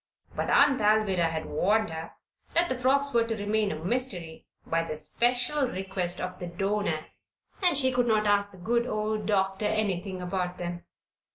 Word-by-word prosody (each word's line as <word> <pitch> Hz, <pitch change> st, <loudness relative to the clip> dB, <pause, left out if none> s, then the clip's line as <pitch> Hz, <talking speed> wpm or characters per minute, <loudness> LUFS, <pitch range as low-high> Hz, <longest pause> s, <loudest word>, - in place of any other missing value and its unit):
But -, -, -2 dB
Aunt 280 Hz, -4 st, +4 dB
Alvirah 205 Hz, -5 st, +3 dB
had 160 Hz, -1 st, -3 dB
warned 205 Hz, +5 st, +1 dB
her 160 Hz, +1 st, -7 dB, 0.4 s
that 340 Hz, +1 st, +3 dB
the 260 Hz, -, 0 dB
frocks 275 Hz, +2 st, +2 dB
were 230 Hz, -1 st, +3 dB
to 225 Hz, -, -1 dB
remain 210 Hz, 0 st, 0 dB
a -, -, -3 dB
mystery 185 Hz, -8 st, -2 dB, 0.2 s
by 165 Hz, 0 st, 0 dB
the 155 Hz, -2 st, -4 dB
special 245 Hz, -, +1 dB
request 185 Hz, -4 st, -2 dB
of 185 Hz, 0 st, -5 dB
the 180 Hz, -, -5 dB
donor, 195 Hz, -2 st, -1 dB, 0.6 s
and 350 Hz, -6 st, +4 dB
she 260 Hz, -2 st, +4 dB
could 245 Hz, -1 st, +1 dB
not 215 Hz, -2 st, +2 dB
ask 205 Hz, 0 st, +2 dB
the 190 Hz, -, -13 dB
good 235 Hz, +7 st, 0 dB
old 215 Hz, -1 st, -2 dB
doctor 195 Hz, 0 st, +1 dB
anything 195 Hz, -3 st, -1 dB
about 180 Hz, 0 st, -3 dB
them. 175 Hz, 0 st, -5 dB
205 Hz, 175 wpm, -28 LUFS, 180-235 Hz, 0.6 s, Aunt